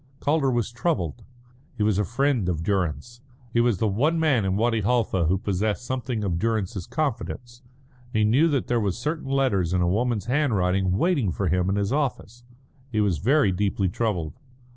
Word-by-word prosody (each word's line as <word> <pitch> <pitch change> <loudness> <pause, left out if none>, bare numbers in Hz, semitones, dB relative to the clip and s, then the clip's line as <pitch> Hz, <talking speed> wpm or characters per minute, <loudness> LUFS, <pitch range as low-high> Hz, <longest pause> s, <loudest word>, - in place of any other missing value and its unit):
Calder 145 -2 +1
was 120 -2 -1
troubled. 120 - -2 0.5
He 105 - 0
was 105 -2 +2
a - - +2
friend 120 -1 0
of 80 -2 -2
Durrance; 95 - -2 0.3
he 115 - +2
was 120 -4 +2
the 110 - +1
one 145 +12 +1
man 140 -10 +2
in 95 0 0
Wadi 115 0 +1
Halfa 105 -5 +1
who 95 +3 +2
possessed 105 +4 -2
something 125 -3 -3
of 90 -4 -1
Durrance's 105 -4 -2
confidence; 120 - -4 0.5
he 110 -2 +1
knew 125 +10 +4
that 140 -5 0
there 120 - +1
were 100 -3 0
certain 150 - -4
letters 105 -11 +1
in 90 - +1
a - - +1
woman's 110 +2 0
handwriting 95 -9 +1
waiting 140 - +1
for 95 +2 -1
him 90 +2 +1
in 95 - +1
his 100 +3 0
office. 125 -5 -2 0.5
He 110 - 0
was 100 -7 +1
very 130 0 +3
deeply 95 0 0
troubled. 90 -6 -2
110 Hz, 185 wpm, -25 LUFS, 95-125 Hz, 0.5 s, knew